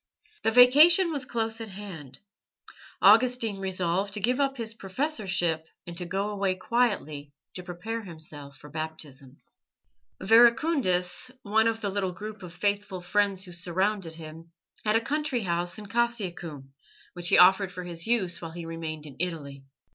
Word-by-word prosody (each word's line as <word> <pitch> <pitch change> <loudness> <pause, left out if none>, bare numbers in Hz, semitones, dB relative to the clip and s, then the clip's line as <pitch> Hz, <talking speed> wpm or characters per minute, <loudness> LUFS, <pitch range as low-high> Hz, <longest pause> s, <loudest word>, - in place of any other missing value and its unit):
The - - +2
vacation 300 - +7
was 285 -4 -3
close 225 -1 -2
at 225 - -6
hand. 175 -10 -9 0.8
Augustine 225 -1 +5
resolved 190 +1 -1
to - - -2
give 245 +6 +1
up 275 -1 +1
his 225 -2 -4
professorship 190 - -2 0.2
and 170 - -8
to 175 0 -4
go 195 +4 -2
away 195 -2 0
quietly 185 -10 -1 0.2
to 180 - -6
prepare 180 +6 -5
himself 155 -6 -9
for 150 - -14
Baptism. 150 -4 -7 0.8
Verecundus, 235 - +3
one 220 +2 +3
of 225 0 -1
the 200 - -2
little 190 -2 -2
group 215 +2 -8
of 180 -2 -9
faithful 200 +1 -2
friends 195 +1 +1
who 180 - -10
surrounded 180 0 -1
him, 165 +1 -11 0.3
had 215 0 +2
a 225 - +4
country 290 -1 -1
house 175 -1 -2
in 210 - -8
Cassiacum, 180 - -3 0.4
which 175 -1 -2
he - - +5
offered 190 +1 +6
for 180 -1 -7
his 170 0 -6
use 190 -8 0
while 165 -1 -7
he 170 -1 -7
remained 160 -2 -6
in 140 -3 -11
Italy. 145 -6 -4
190 Hz, 155 wpm, -27 LUFS, 170-225 Hz, 0.8 s, vacation